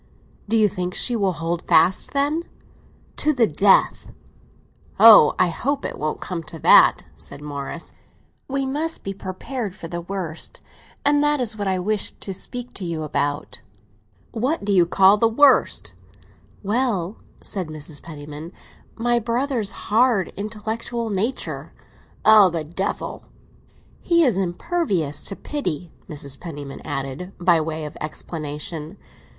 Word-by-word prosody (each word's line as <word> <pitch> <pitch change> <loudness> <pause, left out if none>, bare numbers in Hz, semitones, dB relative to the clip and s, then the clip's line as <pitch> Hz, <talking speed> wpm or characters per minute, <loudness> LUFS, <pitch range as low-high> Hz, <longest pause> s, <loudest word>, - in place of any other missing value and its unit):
"Do 225 - +3
you 215 -1 +5
think 180 -2 -4
she 245 - +1
will 195 -4 +1
hold 165 +2 -2
fast, 185 - +3
then?" 290 +3 +1 0.8
"To 305 +1 +2
the 245 -4 +4
death!" 195 +2 +3 0.9
"Oh, 220 -9 +9
I 180 - +3
hope 275 - -2
it - - -5
won't 155 +1 -2
come 180 -3 -4
to 165 - -9
that," - - +6
said - - -10
Morris. 145 +2 -6 0.5
"We 275 0 -1
must 305 +5 -2
be 195 - -4
prepared 195 +3 -5
for 170 - -8
the 170 +1 -5
worst, 175 -3 -5 0.5
and 290 0 +4
that 295 -1 +2
is 230 -3 -1
what 205 -2 -3
I 190 -1 +1
wish 205 +3 0
to 195 - -4
speak 245 +6 -6
to 195 - -6
you 165 -3 -3
about." 145 -1 -2 0.7
"What 255 +3 -1
do 205 - 0
you 180 -3 +4
call 195 +3 +5
the 230 - +4
worst?" 275 +4 +3 0.7
"Well," 205 -3 -1 0.3
said 190 -4 -3
Mrs. 155 -1 -7
Penniman, 150 +2 -9 0.4
"my 240 +1 +1
brother's 235 -1 -1
hard, 225 -3 +1
intellectual 220 +2 -4
nature." 215 +7 -3 0.5
"Oh, 215 -3 +8
the 165 -2 -3
devil!" 185 +6 -4 0.8
"He 340 -1 +3
is 250 -9 +3
impervious 185 - -1
to 195 - -2
pity," 180 - -4 0.2
Mrs. 140 -2 -6
Penniman 145 -5 -8
added, 135 +8 -5
by 175 -2 +4
way 155 0 -4
of 150 - -8
explanation. 155 +2 -5
195 Hz, 140 wpm, -22 LUFS, 165-235 Hz, 0.9 s, Oh